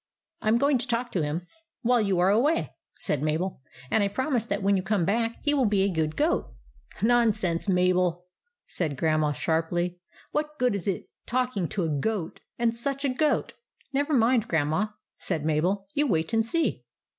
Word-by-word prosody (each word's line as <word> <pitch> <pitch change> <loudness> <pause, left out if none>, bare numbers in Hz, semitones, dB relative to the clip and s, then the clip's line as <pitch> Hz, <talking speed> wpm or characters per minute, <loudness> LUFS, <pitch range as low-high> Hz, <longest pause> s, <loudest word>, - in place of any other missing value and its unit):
" - - -51
I - - -4
'm 220 +2 +5
going 280 +1 +3
to 250 - -4
talk 240 0 -1
to 180 - 0
him 155 +4 -2 0.4
while 245 0 +4
you 200 -3 +1
are 180 +2 +4
away," 285 +10 +2 0.3
said 145 - -1
Mabel; 155 +1 -1 0.3
"and 220 - +3
I - - +2
promise 245 +2 -1
that 200 -1 -2
when 200 +1 +3
you 190 - +1
come 195 -2 0
back 230 +4 0
he 290 - +2
will 270 -5 +3
be 200 -2 +2
a 195 -1 +1
good 155 -1 -1
goat." - - 0 0.3
" 60 - -14
Nonsense, 215 -7 +2
Mabel! 180 -1 +2 0.2
" 480 0 -53
said 155 -6 -1
Grandma, 155 0 +2
sharply. 170 +4 -1 0.3
"What 300 0 -2
good 250 -2 +2
is 200 -3 -3
it 195 - -2 0.2
talking 250 -7 0
to 190 - -2
a - - 0
goat 195 -1 -2
— - - -62
and 235 -1 +2
such 275 +4 -2
a - - +2
goat? 290 +3 +1
" - - -60
" 275 - -34
Never 285 +3 +1
mind, 235 -2 +3
Grandma," 160 +6 +1 0.3
said 160 -5 -2
Mabel. 175 +6 +1
" - - -34
You 295 0 +2
wait 165 -2 0
and 225 0 +3
see." 325 +9 -1
200 Hz, 210 wpm, -27 LUFS, 175-245 Hz, 0.4 s, m